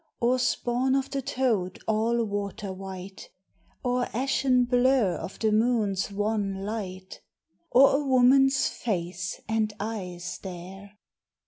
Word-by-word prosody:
Or 250 Hz, +1 st, +2 dB
spawn 250 Hz, +1 st, +1 dB
of 270 Hz, 0 st, -1 dB
the 275 Hz, -, -1 dB
toad 225 Hz, -9 st, -1 dB
all 225 Hz, +2 st, +1 dB
water 205 Hz, -2 st, -4 dB
white? 190 Hz, 0 st, -9 dB, 0.5 s
Or 250 Hz, -1 st, +1 dB
ashen 255 Hz, 0 st, +2 dB
blur 245 Hz, -5 st, +3 dB
of -, -, -7 dB
the 220 Hz, -1 st, +1 dB
moon's 215 Hz, -3 st, +1 dB
wan 200 Hz, -1 st, -1 dB
light? 190 Hz, -3 st, -6 dB, 0.5 s
Or 275 Hz, +2 st, +6 dB
a 295 Hz, -, -2 dB
woman's 270 Hz, +1 st, +4 dB
face 175 Hz, -4 st, -3 dB
and 220 Hz, -1 st, 0 dB
eyes 180 Hz, -5 st, -5 dB
there? 195 Hz, +2 st, -9 dB
220 Hz, 120 wpm, -27 LUFS, 195-250 Hz, 0.5 s, Or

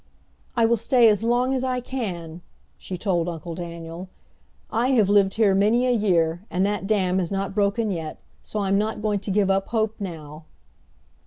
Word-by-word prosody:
"I 230 Hz, -, +5 dB
will 235 Hz, +1 st, +3 dB
stay 235 Hz, +1 st, +4 dB
as 210 Hz, 0 st, +1 dB
long 245 Hz, +3 st, +2 dB
as 260 Hz, -1 st, -1 dB
I 255 Hz, -1 st, 0 dB
can," 180 Hz, -10 st, -5 dB, 0.4 s
she 185 Hz, -, -6 dB
told 175 Hz, -3 st, 0 dB
Uncle 170 Hz, 0 st, -6 dB
Daniel. 170 Hz, +1 st, -7 dB, 0.6 s
"I 235 Hz, +2 st, +1 dB
have 215 Hz, -6 st, +3 dB
lived 200 Hz, -1 st, +3 dB
here 215 Hz, -3 st, +3 dB
many 215 Hz, +6 st, +3 dB
a 250 Hz, -, +2 dB
year, 175 Hz, -7 st, +1 dB
and 185 Hz, +2 st, +1 dB
that 205 Hz, -1 st, -2 dB
dam 190 Hz, -3 st, +1 dB
has 175 Hz, -3 st, -1 dB
not 195 Hz, -1 st, -2 dB
broken 205 Hz, +2 st, +1 dB
yet, 160 Hz, -4 st, -5 dB, 0.2 s
so 210 Hz, -, -4 dB
I'm 195 Hz, 0 st, +2 dB
not 215 Hz, 0 st, -2 dB
going 210 Hz, -2 st, +1 dB
to 200 Hz, -, -7 dB
give 195 Hz, 0 st, +2 dB
up 195 Hz, 0 st, 0 dB
hope 220 Hz, -1 st, 0 dB
now!" 160 Hz, -5 st, -7 dB
200 Hz, 185 wpm, -24 LUFS, 175-220 Hz, 0.6 s, I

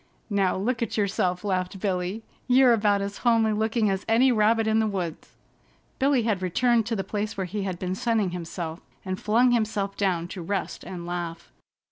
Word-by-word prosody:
"Now 195 Hz, -3 st, +2 dB
look 230 Hz, +5 st, -1 dB
at 230 Hz, -, -2 dB
yourself!" 185 Hz, -3 st, 0 dB
laughed 185 Hz, -1 st, -2 dB
Billy. 185 Hz, +2 st, -2 dB, 0.2 s
"You're 255 Hz, -1 st, +6 dB
about 205 Hz, -2 st, +2 dB
as 200 Hz, 0 st, -4 dB
homely 225 Hz, -3 st, +3 dB
looking 220 Hz, +1 st, +1 dB
as 195 Hz, 0 st, -2 dB
any 245 Hz, +4 st, +5 dB
rabbit 225 Hz, 0 st, +3 dB
in 220 Hz, 0 st, +2 dB
the 220 Hz, -, +2 dB
woods." 180 Hz, -6 st, -5 dB, 0.6 s
Billy 270 Hz, -3 st, +3 dB
had 215 Hz, -4 st, 0 dB
returned 230 Hz, +5 st, +2 dB
to 235 Hz, -, -1 dB
the 195 Hz, -, -2 dB
place 210 Hz, +1 st, -3 dB
where 190 Hz, -, -1 dB
he 205 Hz, +3 st, -4 dB
had 190 Hz, -2 st, -3 dB
been 185 Hz, +1 st, -3 dB
sunning 215 Hz, -2 st, 0 dB
himself, 170 Hz, -1 st, -5 dB, 0.3 s
and 185 Hz, 0 st, -4 dB
flung 240 Hz, +4 st, +3 dB
himself 215 Hz, -4 st, 0 dB
down 180 Hz, -4 st, 0 dB
to 185 Hz, -, -6 dB
rest 195 Hz, +3 st, -3 dB
and 175 Hz, -2 st, -7 dB
laugh. 175 Hz, -1 st, -5 dB
205 Hz, 185 wpm, -26 LUFS, 185-225 Hz, 0.6 s, You're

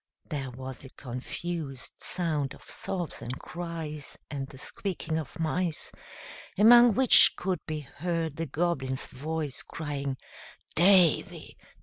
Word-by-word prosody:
There 140 Hz, -5 st, -3 dB
was 130 Hz, +1 st, -7 dB
a 135 Hz, -, -10 dB
confused 135 Hz, +3 st, -5 dB
sound 155 Hz, -6 st, -1 dB
of -, -, -17 dB
sobs 180 Hz, -4 st, -4 dB
and 125 Hz, +3 st, -5 dB
cries 160 Hz, -4 st, -6 dB
and 135 Hz, -2 st, -3 dB
the 135 Hz, -, -13 dB
squeaking 165 Hz, 0 st, -3 dB
of 160 Hz, +2 st, -8 dB
mice, 165 Hz, 0 st, -1 dB, 0.7 s
among 240 Hz, +1 st, +8 dB
which 260 Hz, 0 st, +7 dB
could 185 Hz, -1 st, -1 dB
be 155 Hz, -1 st, -3 dB
heard 160 Hz, +2 st, -3 dB
the 165 Hz, 0 st, -2 dB
Goblin's 135 Hz, -4 st, -1 dB
voice, 150 Hz, 0 st, -3 dB
crying, 140 Hz, -4 st, -4 dB, 0.6 s
"Davy! 180 Hz, -2 st, +4 dB
155 Hz, 120 wpm, -29 LUFS, 135-175 Hz, 0.7 s, among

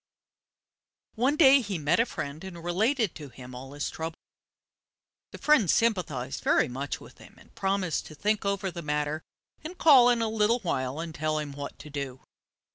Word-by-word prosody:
One 255 Hz, +6 st, +1 dB
day 275 Hz, -3 st, +7 dB
he 200 Hz, -5 st, -3 dB
met 155 Hz, +4 st, +1 dB
a 230 Hz, -, +3 dB
friend 145 Hz, +4 st, -6 dB
and 175 Hz, -3 st, -8 dB
related 215 Hz, -, +1 dB
to 145 Hz, -3 st, -9 dB
him 125 Hz, 0 st, -11 dB
all 130 Hz, +2 st, -9 dB
his 145 Hz, 0 st, -3 dB
troubles. 160 Hz, 0 st, -5 dB, 1.1 s
The -, -, -9 dB
friend 280 Hz, -, +3 dB
sympathized 155 Hz, -, 0 dB
very -, -, +3 dB
much 135 Hz, +3 st, -4 dB
with -, -, -15 dB
him, -, -, -15 dB
and -, -, -20 dB
promised 190 Hz, -4 st, -1 dB
to 155 Hz, -, -11 dB
think 210 Hz, +6 st, 0 dB
over 200 Hz, -1 st, -1 dB
the 170 Hz, 0 st, -6 dB
matter, 150 Hz, 0 st, -2 dB, 0.4 s
and 345 Hz, +4 st, -7 dB
call 270 Hz, -8 st, +7 dB
in 235 Hz, -2 st, +2 dB
a -, -, +1 dB
little 220 Hz, +1 st, +2 dB
while 130 Hz, -6 st, -2 dB
and 165 Hz, -1 st, -5 dB
tell 155 Hz, 0 st, -1 dB
him 150 Hz, -2 st, -3 dB
what 140 Hz, 0 st, -7 dB
to 150 Hz, -, -11 dB
do. 140 Hz, -3 st, -5 dB
170 Hz, 185 wpm, -28 LUFS, 145-220 Hz, 1.1 s, day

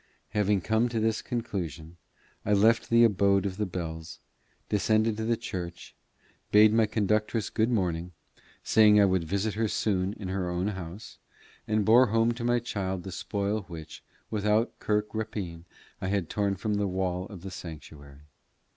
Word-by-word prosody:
Having 105 Hz, -2 st, +1 dB
come 110 Hz, +5 st, +1 dB
to 115 Hz, -1 st, -1 dB
this 110 Hz, 0 st, 0 dB
conclusion, 90 Hz, -9 st, -4 dB, 0.5 s
I 105 Hz, -, +1 dB
left 110 Hz, +3 st, +3 dB
the 115 Hz, 0 st, +6 dB
abode 100 Hz, -2 st, +3 dB
of 95 Hz, -1 st, -3 dB
the 105 Hz, -1 st, -1 dB
bells, 80 Hz, -3 st, -6 dB, 0.5 s
descended 110 Hz, +1 st, +2 dB
to 110 Hz, -, -2 dB
the 115 Hz, 0 st, +1 dB
church, 90 Hz, -7 st, -6 dB, 0.6 s
bade 105 Hz, +1 st, +7 dB
my 110 Hz, -1 st, +4 dB
conductress 105 Hz, +1 st, 0 dB
good 110 Hz, +2 st, +1 dB
morning, 90 Hz, -6 st, -1 dB, 0.5 s
saying 105 Hz, -1 st, +6 dB
I 100 Hz, -, +6 dB
would 95 Hz, -3 st, +1 dB
visit 100 Hz, +5 st, -1 dB
her 110 Hz, +1 st, 0 dB
soon 100 Hz, -2 st, 0 dB
in 100 Hz, -3 st, -7 dB
her 95 Hz, -1 st, -2 dB
own 90 Hz, +3 st, -1 dB
house, 95 Hz, +1 st, -8 dB, 0.5 s
and 110 Hz, -1 st, +1 dB
bore 120 Hz, +3 st, +6 dB
home 115 Hz, +2 st, +2 dB
to 120 Hz, 0 st, -5 dB
my 120 Hz, 0 st, +2 dB
child 95 Hz, -6 st, -3 dB
the 95 Hz, -, -7 dB
spoil 100 Hz, +3 st, -2 dB
which, 80 Hz, -4 st, -9 dB, 0.3 s
without 105 Hz, +2 st, +1 dB
kirk 105 Hz, 0 st, -1 dB
rapine, 100 Hz, -6 st, -5 dB, 0.4 s
I 95 Hz, -, -2 dB
had 95 Hz, -4 st, -1 dB
torn 100 Hz, -1 st, 0 dB
from 105 Hz, +3 st, -2 dB
the 100 Hz, -1 st, 0 dB
wall 90 Hz, 0 st, -2 dB
of 95 Hz, -5 st, -10 dB
the 95 Hz, -, -6 dB
sanctuary. 75 Hz, -4 st, -10 dB
100 Hz, 165 wpm, -28 LUFS, 90-110 Hz, 0.6 s, bade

